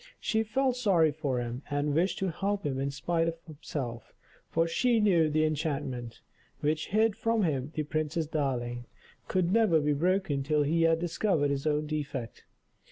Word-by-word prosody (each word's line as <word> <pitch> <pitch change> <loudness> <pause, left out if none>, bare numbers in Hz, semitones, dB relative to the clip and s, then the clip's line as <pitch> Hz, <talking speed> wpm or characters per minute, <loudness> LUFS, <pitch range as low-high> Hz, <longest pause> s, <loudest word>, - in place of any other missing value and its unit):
She 220 - +1
felt 250 +3 0
sorry 180 -10 +3
for 145 -4 -2
him, 120 +1 -4
and 145 0 0
wished 175 +6 +1
to 190 -2 -1
help 200 +3 -2
him 135 -2 -1
in 140 +1 -1
spite 165 +4 0
of 165 0 -2
himself, 140 -7 -6 0.3
for 165 0 +1
she 235 +7 +2
knew 175 -7 +4
the 155 +1 +2
enchantment, 140 -6 -3 0.4
which 155 +1 0
hid 220 +1 +2
from 225 -2 +1
him 145 -4 -1
the 155 - 0
Princess 155 +2 -1
Darling, 125 -5 -2 0.4
could 185 -1 +1
never 215 -8 +4
be 150 0 +1
broken 175 -1 +1
till 150 +2 +1
he 165 +3 +1
had 165 0 +4
discovered 170 -3 +1
his 140 +2 -2
own 150 0 +1
defect. 145 -6 -5
155 Hz, 170 wpm, -29 LUFS, 140-180 Hz, 0.4 s, knew